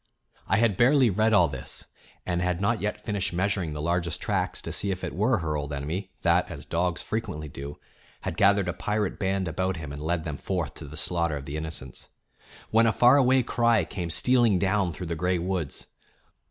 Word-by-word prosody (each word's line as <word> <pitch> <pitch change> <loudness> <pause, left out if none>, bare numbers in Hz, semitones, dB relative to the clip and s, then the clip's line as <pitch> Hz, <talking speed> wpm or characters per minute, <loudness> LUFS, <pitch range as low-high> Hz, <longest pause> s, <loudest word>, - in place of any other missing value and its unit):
I 95 - +3
had 110 -4 +2
barely 130 -1 +5
read 110 +4 +2
all 90 -6 +5
this, 65 -4 -7 0.4
and 90 -1 -1
had 90 -1 0
not 105 +3 +1
yet 105 +1 -3
finished 100 -4 0
measuring 95 -3 0
the 75 - -4
largest 85 0 -1
tracks - - -1
to - - -5
see 100 - -1
if 95 -1 -3
it - - -3
were 110 +5 +2
her 80 -4 -2
old 75 0 -3
enemy 80 +8 -4
that, - - +3
as - - -8
dogs 90 +1 -1
frequently 75 -9 -4
do, 70 +1 -8 0.4
had - - -4
gathered 100 -1 +4
a 90 - -1
pirate 105 -1 -2
band 95 -1 0
about 95 +3 -1
him 75 -3 -6
and 70 - -7
led 80 +1 -1
them 75 -3 -4
forth 85 -3 -3
to 75 - -10
the 75 +2 -9
slaughter 85 -2 0
of 70 - -8
the 70 - -5
innocents, 75 -5 -5 0.6
when 115 +1 +5
a - - +4
far 120 +4 +6
away 130 -1 +4
cry 115 -5 +2
came 85 0 -5
stealing 120 +2 +3
down 95 -1 +1
through 90 - -6
the 85 - -3
gray 90 +3 0
woods. 85 -3 -3
90 Hz, 205 wpm, -27 LUFS, 80-105 Hz, 0.6 s, far